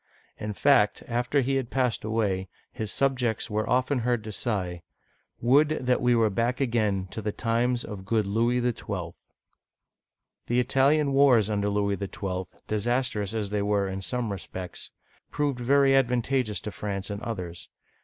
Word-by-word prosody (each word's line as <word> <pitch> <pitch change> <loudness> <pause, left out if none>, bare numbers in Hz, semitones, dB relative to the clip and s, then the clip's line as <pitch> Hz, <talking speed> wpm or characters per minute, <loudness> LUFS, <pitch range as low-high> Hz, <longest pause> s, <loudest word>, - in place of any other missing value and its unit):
In 105 0 -4
fact, 105 -3 +3
after 120 +4 +1
he 135 +1 +1
had 130 -3 -3
passed 125 -4 0
away, 105 -4 -1 0.2
his 110 -2 -5
subjects 125 -6 0
were 110 +2 -1
often 130 +2 +2
heard 120 -1 0
to 110 - -6
sigh, 95 -6 -2 0.6
"Would 145 +3 +3
that 125 0 +2
we 125 0 +3
were 110 -2 +3
back 120 +5 0
again 110 -7 0
to 110 - -5
the 105 0 -2
times 120 +3 0
of 100 -3 -7
good 110 +1 +1
Louis 115 +5 +1
XIL!" 100 -8 -3 1.3
The 120 +1 +2
Italian 140 +3 +3
Wars 125 -7 +5
under 105 -1 0
Louis 100 -1 0
XII., 95 -2 -4 0.2
disastrous 110 -1 -1
as 105 -3 -2
they 105 -1 0
were 100 -1 +1
in 95 0 -4
some 120 +2 -2
re 100 - -4
spects, 90 0 -7 0.4
proved 145 -4 -1
very 135 +2 +4
advantageous 125 -3 +1
to 105 - -5
France 100 0 -4
in 100 +1 -5
others. 90 -7 -5
115 Hz, 160 wpm, -27 LUFS, 100-125 Hz, 1.3 s, Wars